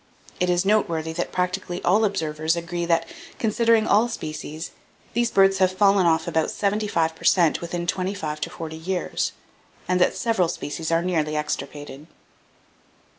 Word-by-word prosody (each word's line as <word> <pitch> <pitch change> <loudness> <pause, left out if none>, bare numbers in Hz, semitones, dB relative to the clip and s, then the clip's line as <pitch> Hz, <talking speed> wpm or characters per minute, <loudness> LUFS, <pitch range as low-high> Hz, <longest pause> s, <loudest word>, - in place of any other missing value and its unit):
It 180 - +1
is 180 +1 +2
noteworthy 170 -6 +1
that 175 +1 -3
practically 180 0 -2
all 210 +5 +4
observers 160 -4 -1
agree 170 0 -3
that, 165 -1 +2 0.3
considering 230 0 +2
all 225 +3 +3
species, 155 -5 -6 0.4
these 235 +1 +1
birds 195 -2 +4
have 185 -1 +4
fallen 195 -1 +4
off 160 -1 +2
about 160 -1 +1
75 200 -6 0
per - - -15
cent 170 -4 +4
within 175 0 -4
twenty 185 +2 -1
five 155 -4 -4
to 165 - -2
forty 160 -2 -7
years, 180 +2 -2 0.5
and 180 0 +1
that - - +3
several 225 -7 +1
species 160 +1 -4
are 165 +1 +2
nearly 155 -4 0
extirpated." 150 -1 -5
175 Hz, 155 wpm, -24 LUFS, 160-195 Hz, 0.5 s, all